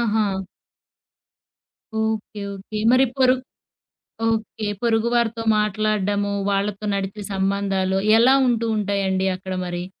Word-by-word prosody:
ఆహా! 220 -2 +2 1.8
Okay. 220 -1 -3
Okay. 200 +2 -6
మరి 260 +1 +5
పొరు 255 -1 +5 0.9
okay. 220 -1 -2
పొరుగు 230 -1 +2
వారితో 230 -1 0
మాట్లాడ్డము, 205 -1 0 0.2
వాళ్ళతో 200 +1 -1
నడిపె 195 +1 -4
సంబంధాలు 195 -1 0 0.2
ఎలా 260 +3 +6
ఉంటూ 230 -2 +1
ఉంటాయండి 195 -2 0
అక్కడ 190 0 -6
మరి? 175 0 -4
210 Hz, 100 wpm, -22 LUFS, 195-225 Hz, 1.8 s, ఎలా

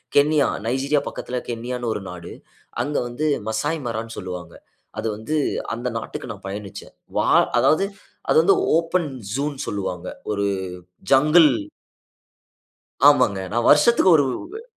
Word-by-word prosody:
Kenya, 145 0 +4 0.2
Nigeria 135 +5 +1
பக்கத்தில 125 - -5
கென்யான்னு 120 +1 -3
ஒரு 105 - -5
நாடு. 90 -1 -9 0.5
அங்க 145 +4 -2
வந்து 120 +6 -3 0.2
மசாய்மரான்னு 115 -2 -3
சொல்லுவாங்க. 90 -3 -7 0.5
அது 110 - -2
வந்து 110 +9 -4 0.4
அந்த 120 +2 -4
நாட்டுக்கு 115 +2 -6
நா 105 - -7
பயணிச்சேன். 100 0 -8 0.2
வா - - +2 0.3
அதாவது 175 +5 +3 0.4
அது - - +4
வந்து 395 - +5 0.2
ஓப்பன் 170 0 0 0.3
ஜூன்னு 140 +1 -2
சொல்லுவாங்க. 95 -3 -4 0.2
ஒரு 100 -1 0 0.7
ஜங்குள் 150 +4 +6 1.6
ஆமாங்க. 125 -9 +2
நான் 120 +1 0
வருஷத்துக்கு 190 +6 +5
ஒரு 145 - +3 0.2
உவே 430 +7 -9
125 Hz, 120 wpm, -22 LUFS, 105-150 Hz, 1.6 s, ஜங்குள்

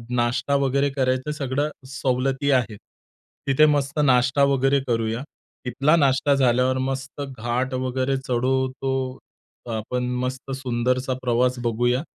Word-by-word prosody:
नाश्ता 120 +4 +1
वगैरे 140 +1 +1
करायचं 130 +1 0
सगळ्या 145 0 -1 0.2
सवलती 135 +1 0
आहेत. 120 -5 +1 0.7
तिथे 140 +3 +5
मस्त 145 0 +1
नाश्ता 130 +1 +3
वगैरे 140 0 +3
करूया. 115 0 -1 0.4
तिथला 140 +6 +2
नाश्ता 140 -2 +3
झाल्यावर 130 0 +2
मस्त 135 +2 -5 0.2
घाट 120 +4 -2
वगैरे 130 +1 -1
चढून 130 0 0
तो 130 0 -3 0.6
आपण 125 +3 -3 0.2
मस्त 130 +1 -4
सुंदरसा 125 0 -1
प्रवास 125 0 +1
बघूया. 120 +2 +1
130 Hz, 120 wpm, -23 LUFS, 125-135 Hz, 0.7 s, तिथे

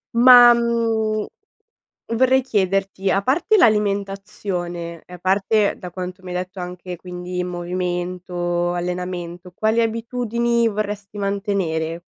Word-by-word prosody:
Ma, 245 0 +9
mhmm, 225 -2 0 0.9
vorrei 260 +2 +4
chiederti: 195 -4 0
a 195 - +2
parte 305 - +2
l'alimentazione 195 - -1
e 180 - -12
a - - -10
parte, 200 +3 +2
da 180 - -8
quanto 185 +1 -7
mi 185 - -10
hai 180 - -3
detto, 185 +1 -5
anche, 180 0 -6
quindi, 180 +1 -5
movimento, 175 0 -2
allenamento, 180 0 -4
quali 220 +5 +1
abitudini 235 +1 0
vorresti 205 -1 -4
mantenere? 195 -5 -2
195 Hz, 115 wpm, -21 LUFS, 180-220 Hz, 0.9 s, Ma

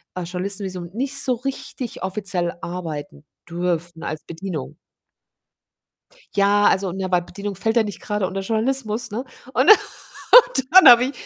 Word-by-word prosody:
äh, 180 - -4
Journalistenvisum 185 0 -4
nicht 275 +4 -1
so 255 - +1
richtig 255 -2 -6
offiziell 190 -3 -3
arbeiten 160 -4 -7 0.3
dürfen 175 -1 -3
als 155 - -5
Bedienung. 165 -4 -6 1.6
Ja, 205 +1 +3
also, 190 -2 +2
ne, 190 0 -4
weil 180 -1 +3
Bedienung 200 +3 -7
fällt 225 +5 -2
ja 230 - +5
nicht 205 -2 -7
grade 210 -5 -2
unter 195 +1 -4
Journalismus, 225 +1 -1
ne, 235 +5 -4 0.3
und 260 +10 +3 0.6
und 485 - +7
dann 375 0 +9
habe 240 +1 +8
ich 270 - -3
200 Hz, 145 wpm, -21 LUFS, 180-235 Hz, 1.6 s, dann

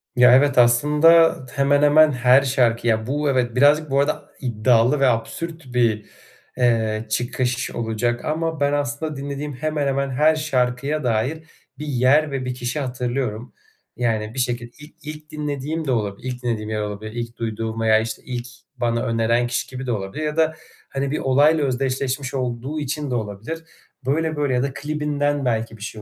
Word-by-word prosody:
Ya 125 0 +7
evet, 140 0 +3
aslında 150 +7 +5 0.2
hemen, 140 +1 +2
hemen 150 +1 +6
her 125 +1 +5
şarkı 120 -3 +1
ya 110 0 +1
Bu 145 +1 0
evet 125 -3 0
birazcık, 145 +3 +4
bu 140 - +3
arada 145 +1 0
iddialı 120 +2 +2
ve 135 - +4
absürt 130 +5 -3
bir, 115 -3 +1 0.5
eee, 115 -3 +1
çıkış 120 +2 -1
olacak 120 +1 -2
ama 160 0 -2
ben 145 0 +1
aslında 145 +2 -2
dinlediğim 140 +1 -5
hemen, 150 +1 -2
hemen 140 0 0
her 150 +4 +3
şarkıya 140 0 -1
dair 125 +7 -1 0.4
bir 150 - -5
yer 140 +3 +3
ve 130 -2 -3
bir 125 - -2
kişi 125 +4 -3
hatırlıyorum. 125 -3 -3 0.4
Yani, 110 -2 -1
bir 130 - -5
şeki 120 -1 -2
il 150 - -12
ilk 150 0 -9
dinlediğim 150 +1 -3
de 135 - 0
olabilir, 105 0 -2
ilk 125 0 -8
dinlediğim 110 -3 -2
yer 110 -1 -2
olabilir, 105 +1 -5
ilk 120 0 -6
duyduğum 115 0 -3
veya, 110 -1 +4
işte, 110 0 -4
ilk 125 -1 -5 0.3
bana 115 -1 0
öneren 115 +1 +1
kişi 120 - -2
gibi 130 0 -6
de 125 - -2
olabilir 100 +7 -4
ya 150 +1 -3
da, 160 -1 +3 0.4
hani, 140 0 -2
bir - - -1
olayla 145 +3 +3
özdeşleşmiş 130 0 -2
olduğu 130 +3 -3
için 145 -1 -3
de - - 0
olabilir, 110 +9 -5 0.4
böyle, 160 +3 0
böyle 145 -3 0
ya 125 - +1
da 140 -1 -2
klibinden 145 -1 -1
belki 115 -1 -1
bir 105 - -19
şey 110 0 -7
130 Hz, 175 wpm, -22 LUFS, 120-145 Hz, 0.5 s, Ya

